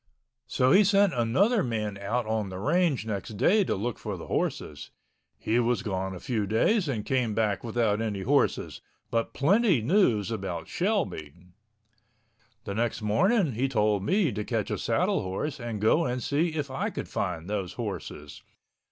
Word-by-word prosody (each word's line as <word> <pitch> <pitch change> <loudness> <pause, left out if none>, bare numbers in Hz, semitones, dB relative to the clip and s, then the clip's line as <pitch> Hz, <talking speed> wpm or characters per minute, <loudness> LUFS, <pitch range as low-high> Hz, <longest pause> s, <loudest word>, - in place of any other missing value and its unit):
So 130 0 +2
he 200 +5 +7
sent 200 -1 +4
another 185 - +2
man 110 -4 -2
out 110 +4 -1
on 110 -2 -1
the 95 - -6
range 150 - +1
next 105 0 -5
day 205 - +4
to - - 0
look 115 +4 -3
for - - -5
the - - -8
horses. 75 -1 -3 0.5
He 115 +2 0
was 120 0 +1
gone 95 -2 -3
a - - -8
few 110 -3 -2
days 165 - +2
and 110 -6 -2
came 125 -5 0
back 105 -3 0
without 115 -2 0
any 105 -3 -2
horses... 95 - 0 0.3
but 115 0 -1
plenty 190 - +3
news 115 - +2
about 95 -7 -4
Shelby. 175 - -2 1.3
The 100 - -5
next 115 +1 -1
morning 160 - +2
he 125 +4 -1
told 105 -5 +1
me 185 - +2
to 105 +1 -3
catch - - -2
a - - -2
saddle - - +1
horse 135 +11 -4
and 115 -3 -4
go 110 +11 +3
and 125 -1 -2
see 155 +5 0
if 145 -3 -3
I 135 - -2
could - - -6
find 85 -1 -3
those 100 -3 -3
horses. 75 0 -6
115 Hz, 170 wpm, -27 LUFS, 105-150 Hz, 1.3 s, he